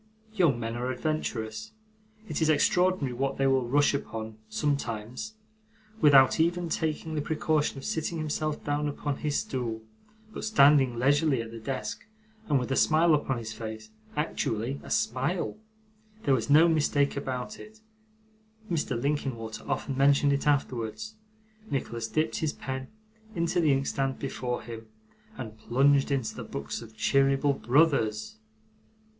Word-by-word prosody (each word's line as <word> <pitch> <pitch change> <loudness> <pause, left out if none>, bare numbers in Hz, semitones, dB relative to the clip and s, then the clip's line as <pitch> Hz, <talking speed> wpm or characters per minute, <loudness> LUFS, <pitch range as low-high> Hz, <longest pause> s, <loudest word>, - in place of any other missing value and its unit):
Young 170 - +3
men 115 0 -3
are 125 +1 -2
adventurous. 115 -6 -3 0.5
It - - -3
is 160 - +3
extraordinary 180 -2 +2
what 135 +2 -2
they 135 - +1
will 135 -2 +2
rush 145 +4 +3
upon, 110 -5 -5
sometimes. 140 - -3 0.7
Without 140 -1 +6
even 170 +1 +1
taking 160 0 -2
the 150 - -1
precaution 155 -1 0
of 135 - -8
sitting 170 -5 -2
himself 155 -1 -2
down 145 +1 -1
upon 145 -1 -3
his 150 -2 -1
stool, 115 -4 -3 0.5
but - - -6
standing 140 - +5
leisurely 140 +2 +3
at 115 0 -5
the 115 - -8
desk, 130 +3 -4 0.5
and 145 - +4
with 125 0 -2
a - - +2
smile 160 +3 +4
upon 140 -3 +1
his 110 -1 -6
face 110 0 -7 0.3
actually 130 -4 -2
a - - -10
smile 125 - 0 0.7
there 140 - +3
was 115 -4 0
no 155 +4 +7
mistake 145 -3 +2
about 135 +8 -4
it; 220 0 -13 0.9
Mr 145 -7 -1
Linkinwater 130 -5 -3
often 135 - -2
mentioned 140 +1 +4
it 140 +1 -1
afterwards 140 - -1 0.6
Nicholas 115 -4 -3
dipped 155 +7 0
his 155 -2 -1
pen 130 0 -5 0.5
into 170 +1 +1
the 155 -3 +4
inkstand 135 0 0
before 125 -2 -3
him, 115 -1 -8 0.5
and 110 -4 -7
plunged 135 +5 +3
into 135 -5 -1
the - - -7
books 70 +7 -5
of 110 -1 -13
Cheeryble 135 +3 +3
Brothers! 120 -7 +1
135 Hz, 145 wpm, -28 LUFS, 120-150 Hz, 0.9 s, no